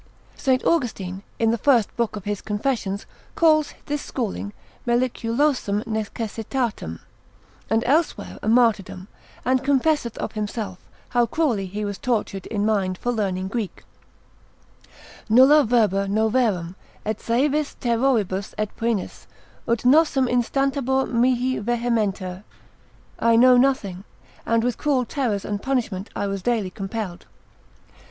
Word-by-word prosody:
St. 260 -2 +1
Austin, 205 - 0 0.2
in 225 -1 +2
the 230 - -1
first 240 -6 +3
book 235 -2 -1
of 205 - -6
his 205 -1 -2
confess. 220 +2 -1
et - - -1
4 195 - -1
ca. - - -15 0.3
calls 310 -2 +3
this 295 0 -2
schooling 205 -4 -4 0.4
meliculosam 240 -2 +1
necessitatem, 220 - -3 0.7
and 225 +1 +2
elsewhere 305 +6 0
a - - -5
martyrdom, 215 -5 +2 0.4
and 255 +1 +2
confesseth 280 -3 +1
of - - -3
himself, 210 -3 -4 0.3
how 240 -1 +2
cruelly 240 -13 0
he 205 +3 -4
was 200 -1 -4
tortured 215 -5 -2
in 205 -2 -1
mind 195 -4 +1
for 245 - -1
learning 190 -5 -1
Greek, 210 0 -4 1.5
nulla 265 +6 +7
verba 210 -5 +2
noveram, 215 -4 +1 0.3
et 215 0 -2
saevis 285 +5 0
terroribus 230 -6 0
et 215 -1 -3
poenis, 230 -4 -2 0.4
ut 235 -1 +1
nossem, 280 0 +5
instabatur 265 +2 0
mihi 250 +2 +2
vehementer, 210 -5 -1 0.8
I 230 0 +4
know 250 +2 +7
nothing, 245 -8 +1 0.4
and 230 0 +2
with 245 0 -1
cruel 275 -4 +1
terrors 225 -6 -2
and 205 -1 -3
punishment 225 -7 -2
I - - -1
was 195 -1 -3
daily 220 -4 0
compelled. 195 -2 -5
230 Hz, 130 wpm, -23 LUFS, 205-255 Hz, 1.5 s, nulla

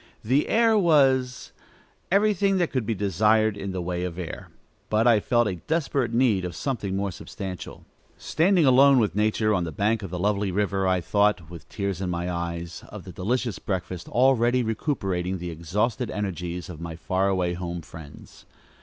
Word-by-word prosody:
The 130 +7 +2
air 225 0 +4
was 135 -7 +2 0.6
everything 200 -1 +3
that 175 -3 0
could 125 -5 -2
be 115 - 0
desired 105 +2 +2
in 100 -1 -5
the 90 -1 -4
way 90 0 -3
of 90 -2 -4
air, 90 -4 -7 0.4
but 110 +1 +2
I 115 -3 +5
felt 120 +2 +2
a 95 -3 -3
desperate 140 - -1
need 115 -6 +2
of 90 -1 -5
something 105 -8 -3
more 100 0 -1
substantial. 95 +1 -8 0.3
Standing 175 0 +2
alone 135 +1 +6
with 105 -8 +2
nature, 110 +1 +1
on 90 -3 +1
the 80 - -4
bank 105 +7 0
of 95 - -6
the 90 - -4
lovely 100 +1 0
river, 95 0 0
I 95 -1 +2
thought, 100 -2 +1
with 85 - -11
tears 100 -3 -3
in 95 - -2
my 85 0 -2
eyes, 85 -1 -5
of - - -9
the - - -9
delicious 115 0 -2
breakfast 90 -2 -4
already 125 -1 +3
recuperating 95 - -2
the 90 -1 -5
exhausted 105 - -2
energies 90 -3 -4
of 85 -3 -9
my 85 -1 -6
far 95 +4 -1
away 90 -2 0
home 85 -1 -5
friends. 75 -3 -13
100 Hz, 180 wpm, -25 LUFS, 90-120 Hz, 0.6 s, alone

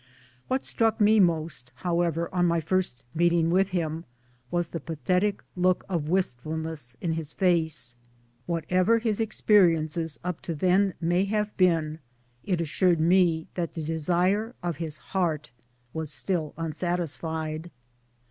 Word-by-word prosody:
What 260 +1 -1
struck 225 0 +1
me 215 +1 +5
most, 160 -8 +1
however, 170 +2 0
on 175 -1 +3
my 170 0 +2
first 165 -5 -1
meeting 170 0 +3
with 190 +2 +3
him, 165 -3 -2 0.4
was 175 +1 -1
the 165 - -4
pathetic 180 +7 -1
look 180 0 +2
of 165 -5 -2
wistfulness 160 -5 -2
in 170 - -1
his 160 -2 -5
face. 160 -10 0 0.5
Whatever 180 +6 +2
his 225 -2 -1
experiences 165 -8 +2
up 180 -1 -3
to 165 - -4
then 185 +4 +2
may 175 +3 +2
have 210 +1 -1
been, 165 -4 +2 0.4
it 180 -4 0
assured 170 +1 +2
me 170 -1 +3
that 170 -2 -3
the 160 - -3
desire 180 +8 0
of 170 -4 -2
his 160 -3 -4 0.2
heart 165 -8 0 0.4
was 160 -2 -3
still 160 -1 -2
unsatisfied. 160 -1 -3
170 Hz, 135 wpm, -27 LUFS, 160-185 Hz, 0.5 s, me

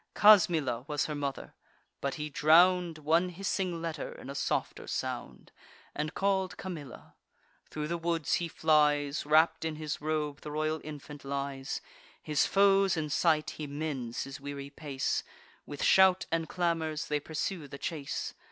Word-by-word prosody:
Casmilla 170 - +5
was 150 -1 0
her 155 - -3
mother; 140 -2 -4 0.5
but 140 - -2
he 150 -1 -4
drown'd 170 +3 +4
One 165 +4 +2
hissing 180 -2 -2
letter 165 -3 -4
in - - -9
a - - -5
softer 140 - -2
sound, - - -5 0.4
And 150 +2 -3
call'd 190 -2 0
Camilla. 155 -9 -8 0.6
Thro' 150 -1 -4
the 170 +2 -2
woods 165 -2 -1
he 170 - -1
flies; 150 -3 +2
Wrapp'd 160 +1 +4
in 160 -1 -2
his 150 -1 -4
robe 150 -1 -2
the - - -7
royal 155 +1 -1
infant 150 -1 -9
lies. 140 -1 -3 0.4
His 150 -2 +1
foes 195 -2 +4
in 150 -2 -2
sight, 155 0 +2
he 150 - -6
mends 140 -5 -3
his 135 -1 -8
weary 140 0 -6
pace; 140 -3 -2 0.4
With 145 - -5
shout 190 -1 +5
and 165 -1 -1
clamours 160 -4 -1
they 150 0 0
pursue 160 +2 -4
the 140 - -8
chase. 145 -2 -4
155 Hz, 150 wpm, -30 LUFS, 145-170 Hz, 0.6 s, Casmilla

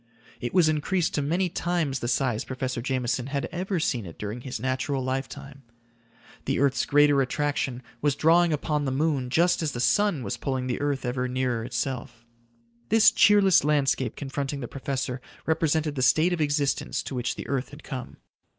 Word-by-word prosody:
It 120 - -3
was 180 -3 +4
increased 155 +3 0
to 145 - 0
many 170 +6 0
times 170 -5 -1
the 120 - -3
size 120 -2 0
Professor 130 -2 -4
Jameson 125 -1 -1
had 140 0 -2
ever 185 +1 -2
seen 120 - -1
it 85 - -11
during 105 +4 -5
his 125 -3 -5
natural 130 +2 -1
lifetime. 135 +1 -5 0.8
The 135 - 0
earth's 140 -1 +2
greater 145 -1 +5
attraction 135 -2 -1 0.2
was 145 -2 +2
drawing 165 +3 +4
upon 150 0 -1
the 135 - -1
moon 140 -2 0
just 170 +7 +2
as 155 -4 -1
the 120 - -4
sun 160 +4 +2
was 100 - -3
pulling 130 -2 -2
the 125 +1 -2
earth 145 -2 -1
ever 125 +1 -1
nearer 125 -2 -1
itself. 120 -1 -4 0.6
This 225 -1 +6
cheerless 200 -5 +5
landscape 140 -5 +1
confronting 140 0 -4
the 120 - -5
professor 130 -1 -4 0.2
represented 160 -1 +1
the 135 - -3
state 160 +7 +4
of 170 - -1
existence 145 -1 0
to - - -6
which 125 -1 -2
the - - -7
earth 135 -2 -2
had 145 +2 -13
come. 130 -4 -7
140 Hz, 180 wpm, -26 LUFS, 125-155 Hz, 0.8 s, This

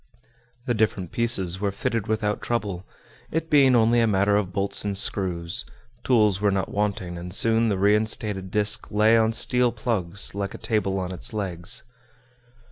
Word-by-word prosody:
The 120 - 0
different 105 -6 -1
pieces 95 -6 +2
were 100 - 0
fitted 110 +2 -3
without 105 -1 -1
trouble, 100 -6 -3 0.4
it 160 +1 -3
being 135 -4 +5
only 115 +1 +3
a 115 - +2
matter 100 0 +2
of 100 -3 -1
bolts 100 +1 -2
and 100 -1 -2
screws; 90 -4 0 0.4
tools 105 -6 +2
were 105 - +3
not 95 -1 -1
wanting, 100 -4 -2
and 90 +1 -8
soon 115 +3 +3
the 100 - 0
reinstated 105 -1 0
disc 105 +1 +1
lay 110 +2 +3
on 110 0 +3
steel 125 +1 +1
plugs, 100 -6 -1
like 100 0 -4
a - - -7
table 105 -4 -1
on 90 0 -4
its 90 +4 -5
legs. 90 -5 -2
105 Hz, 165 wpm, -24 LUFS, 95-115 Hz, 0.4 s, being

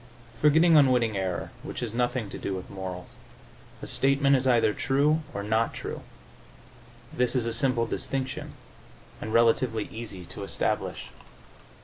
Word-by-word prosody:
Forgetting 160 +3 +6
unwitting 125 -6 +4
error, 95 -2 -2
which - - -6
has 115 -3 -2
nothing 120 -1 0
to - - -7
do 95 - -3
with 95 - -7
morals, 95 -2 -7 0.7
a - - -3
statement 140 +1 +3
is 130 0 +1
either 115 -4 +4
true 140 +7 +2
or 100 - -4
not 110 +2 0
true. - - -5 1.1
This 125 +1 0
is 125 -3 +1
a 115 - -1
simple 120 -1 +1
distinction 130 +3 -4 0.7
and 110 - -4
relatively 115 -1 +3
easy 105 -6 -7
to 90 +3 -8
establish. 100 - -2
120 Hz, 140 wpm, -27 LUFS, 105-135 Hz, 1.1 s, Forgetting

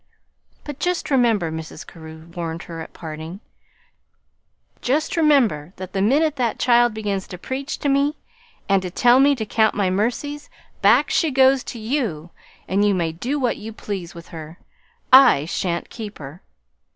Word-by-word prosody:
"But 290 -2 -8
just 355 -4 -1
remember," 230 - +2
Mrs. 160 0 -7
Carew 160 -1 -12
warned 165 -1 -4
her 165 -1 -8
at - - -9
parting, 160 +3 -8 1.4
"just 295 +5 0
remember 245 - +2
that 185 0 -8
the 195 - -1
minute 290 +8 +2
that 240 -3 0
child 240 -2 +3
begins 200 -3 -3
to 180 - -8
preach 270 - -5
to - - -3
me 280 +2 +1 0.5
and 195 -1 +3
to 185 - -5
tell 245 +7 +4
me 280 +1 +5
to 220 -4 -4
count 220 +1 +2
my 195 -3 +1
mercies, 250 +9 -2 0.3
back - - +4
she 325 - +2
goes 265 -1 +4
to - - -7
you, 215 - -3 0.4
and 195 +2 +1
you 205 -1 +3
may 170 -3 -1
do 240 - -3
what 250 -3 0
you 220 +1 -8
please 195 -6 -6
with 170 0 -11
her. 160 0 -9 0.6
I 260 - +7
sha'n't 170 +1 -3
keep 215 -3 -8
her!" 145 +4 -10
210 Hz, 165 wpm, -21 LUFS, 170-265 Hz, 1.4 s, I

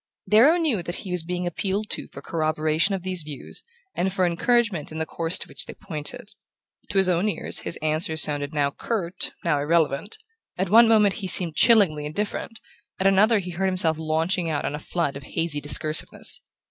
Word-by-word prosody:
Darrow 235 - +5
knew 300 - 0
that 175 +1 -5
he 185 - -6
was 180 -1 0
being 180 +2 -4
appealed 195 +4 -3
to - - -1
for 140 - -12
corroboration 155 +3 0
of 185 - -7
these 185 -2 +1
views 150 -3 -3 0.3
and 190 +2 -1
for 185 -1 +1
encouragement 185 -1 0
in 160 - -7
the 160 - -1
course 165 +2 -1
to - - -1
which - - -2
they - - -9
pointed. 155 +2 -7 0.6
To 200 - -3
his 190 -1 +6
own 180 +3 +1
ears 175 - -1
his - - -2
answers 160 +1 +1
sounded 145 -1 -1
now 145 -2 0
curt, 185 -1 -3
now 150 -4 +1
irrelevant: 155 +4 0 0.4
at 190 0 -2
one 230 +2 +7
moment 210 -3 +4
he 190 - -3
seemed 175 -3 +3
chillingly 185 -11 +4
indifferent, 210 +6 -5 0.4
at 190 - -1
another 205 +4 +4
he 180 -3 -4
heard 190 +3 -1
himself 175 -4 0
launching 160 +2 0
out 150 -2 -2
on - - -3
a 150 - -5
flood 160 -3 -3
of 140 - -7
hazy 150 +1 -1
discursiveness. 155 +2 +2
175 Hz, 195 wpm, -24 LUFS, 155-195 Hz, 0.6 s, one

